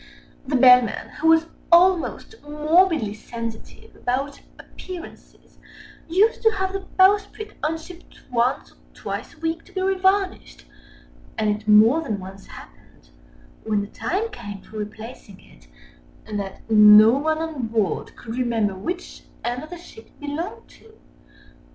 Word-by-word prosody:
The 280 Hz, -, -1 dB
Bellman, 250 Hz, -3 st, +5 dB
who 320 Hz, -, +1 dB
was 325 Hz, 0 st, +5 dB, 0.3 s
almost 360 Hz, +3 st, +3 dB
morbidly 300 Hz, -, +2 dB
sensitive 230 Hz, +1 st, -9 dB
about 270 Hz, +3 st, -3 dB, 0.2 s
appearances, 360 Hz, -2 st, -12 dB, 0.5 s
used 405 Hz, +7 st, +2 dB
to 445 Hz, -, +5 dB
have 380 Hz, -1 st, -2 dB
the 390 Hz, -, -2 dB, 0.2 s
bowsprit 410 Hz, +2 st, +2 dB
unshipped 325 Hz, +3 st, -6 dB
once 245 Hz, +1 st, 0 dB
or -, -, -26 dB, 0.2 s
twice -, -, -6 dB
a -, -, -23 dB
week 325 Hz, 0 st, -3 dB
to -, -, -19 dB
be 380 Hz, -, -4 dB
revarnished, 380 Hz, 0 st, 0 dB, 0.7 s
and 215 Hz, -1 st, +1 dB
it 215 Hz, 0 st, -12 dB
more 220 Hz, +9 st, +6 dB
than 215 Hz, -10 st, -3 dB
once 190 Hz, +1 st, -11 dB
happened, -, -, -16 dB, 0.5 s
when 215 Hz, -2 st, 0 dB
the -, -, -4 dB
time 420 Hz, +6 st, -2 dB
came 205 Hz, -, -9 dB
for 220 Hz, -, -11 dB
replacing 210 Hz, -1 st, -9 dB
it, -, -, -21 dB, 0.7 s
that 195 Hz, -2 st, -5 dB
no 210 Hz, 0 st, +8 dB
one 310 Hz, +5 st, 0 dB
on 315 Hz, -7 st, -4 dB
board 220 Hz, -5 st, -2 dB
could 225 Hz, -, -8 dB
remember 225 Hz, -5 st, 0 dB
which 345 Hz, -, -6 dB, 0.2 s
end 245 Hz, +1 st, -2 dB
of 310 Hz, -, -10 dB
the 350 Hz, -, -8 dB
ship 225 Hz, -9 st, -14 dB
it -, -, -29 dB
belonged 300 Hz, +6 st, -6 dB
to. 445 Hz, -, -19 dB
280 Hz, 140 wpm, -22 LUFS, 220-355 Hz, 0.7 s, no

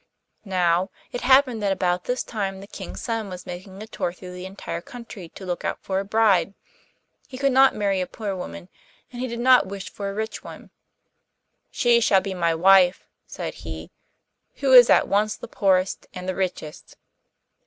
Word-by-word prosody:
Now, 180 Hz, 0 st, +2 dB, 0.2 s
it 245 Hz, -, -4 dB
happened 260 Hz, -3 st, +4 dB
that 200 Hz, -1 st, +1 dB
about 180 Hz, -2 st, 0 dB
this 250 Hz, +1 st, -1 dB
time 195 Hz, -4 st, -4 dB
the 195 Hz, -, -10 dB
King's 205 Hz, -, -8 dB
son 225 Hz, -3 st, -3 dB
was 180 Hz, -1 st, -8 dB
making 190 Hz, +3 st, -8 dB
a -, -, -8 dB
tour 215 Hz, -5 st, -3 dB
through 180 Hz, 0 st, -11 dB
the 180 Hz, +1 st, -7 dB
entire 180 Hz, -3 st, -6 dB
country 225 Hz, -5 st, -10 dB
to 190 Hz, -, -11 dB
look 175 Hz, -1 st, -4 dB
out -, -, -2 dB
for 190 Hz, 0 st, -1 dB
a -, -, -2 dB
bride. 200 Hz, -3 st, +2 dB, 0.7 s
He 260 Hz, -, -9 dB
could 275 Hz, +1 st, +1 dB
not 265 Hz, +1 st, +5 dB
marry 200 Hz, -2 st, 0 dB
a 180 Hz, -, -2 dB
poor 205 Hz, -3 st, -5 dB
woman, 185 Hz, 0 st, -8 dB, 0.4 s
and 245 Hz, 0 st, -7 dB
he 255 Hz, -, -2 dB
did 235 Hz, -1 st, -5 dB
not 255 Hz, -2 st, +5 dB
wish 195 Hz, 0 st, -7 dB
for 200 Hz, -1 st, -5 dB
a -, -, -5 dB
rich 220 Hz, 0 st, -4 dB
one. -, -, -11 dB, 1.0 s
'She 240 Hz, -1 st, +3 dB
shall 195 Hz, -3 st, +4 dB
be 190 Hz, 0 st, -5 dB
my 170 Hz, -2 st, 0 dB
wife,' 185 Hz, +1 st, +5 dB, 0.2 s
said -, -, -6 dB
he, -, -, -8 dB, 0.6 s
'who 270 Hz, -2 st, +1 dB
is 245 Hz, -2 st, +9 dB
at -, -, +5 dB
once 210 Hz, +1 st, +1 dB
the -, -, -10 dB
poorest 190 Hz, -1 st, 0 dB
and 180 Hz, 0 st, -7 dB
the 185 Hz, -, -1 dB
richest. 180 Hz, -5 st, -5 dB
195 Hz, 190 wpm, -24 LUFS, 185-225 Hz, 1.0 s, is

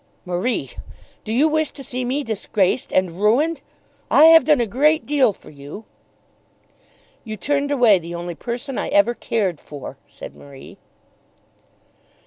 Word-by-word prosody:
"Marie, 180 Hz, +8 st, -2 dB, 0.5 s
do 215 Hz, -, -6 dB
you 265 Hz, +7 st, +3 dB
wish 315 Hz, -1 st, 0 dB
to 275 Hz, -, -12 dB
see 255 Hz, -1 st, -4 dB
me 265 Hz, +4 st, -2 dB
disgraced 215 Hz, -2 st, -1 dB
and 185 Hz, 0 st, -1 dB
ruined? 285 Hz, +10 st, +2 dB, 0.5 s
I 300 Hz, -, +6 dB
have 325 Hz, 0 st, +8 dB
done 300 Hz, -3 st, +4 dB
a 240 Hz, -, +1 dB
great 300 Hz, +9 st, +1 dB
deal 285 Hz, -6 st, +2 dB
for 195 Hz, -, -16 dB
you." 145 Hz, +9 st, -11 dB, 1.4 s
"You 215 Hz, -2 st, -7 dB
turned 285 Hz, +7 st, -1 dB
away 240 Hz, -9 st, +4 dB
the 170 Hz, 0 st, -8 dB
only 175 Hz, 0 st, -5 dB
person 245 Hz, -, -5 dB
I -, -, -3 dB
ever 200 Hz, +4 st, +3 dB
cared 195 Hz, -9 st, -2 dB
for," 145 Hz, -2 st, -10 dB
said -, -, -11 dB
Marie. 140 Hz, -1 st, -14 dB
235 Hz, 145 wpm, -21 LUFS, 185-285 Hz, 1.4 s, have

